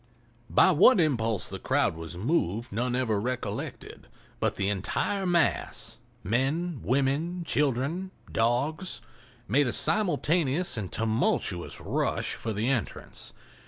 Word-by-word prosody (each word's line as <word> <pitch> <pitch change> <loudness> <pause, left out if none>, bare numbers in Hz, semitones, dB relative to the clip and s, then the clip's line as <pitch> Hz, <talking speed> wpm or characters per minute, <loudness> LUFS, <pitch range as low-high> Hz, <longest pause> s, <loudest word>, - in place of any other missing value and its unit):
By - - +5
what 185 - +6
impulse 115 - +1
the - - -6
crowd - - +1
was 80 +1 -7
moved 115 - 0
none 120 +4 -1
ever 110 -5 +1
recollected, 125 +2 -5 0.3
but - - 0
the 100 - -1
entire 145 - -1
mass—men, 155 - -1
women, 140 +7 0
children, 145 +5 0 0.2
dogs—made 120 - -1
a - - 0
simultaneous 175 - +2
and 105 -5 -4
tumultuous 110 -5 0
rush - - -1
for 115 - -4
the 110 +3 -1
entrance. 130 -5 -3
130 Hz, 110 wpm, -28 LUFS, 115-160 Hz, 0.3 s, what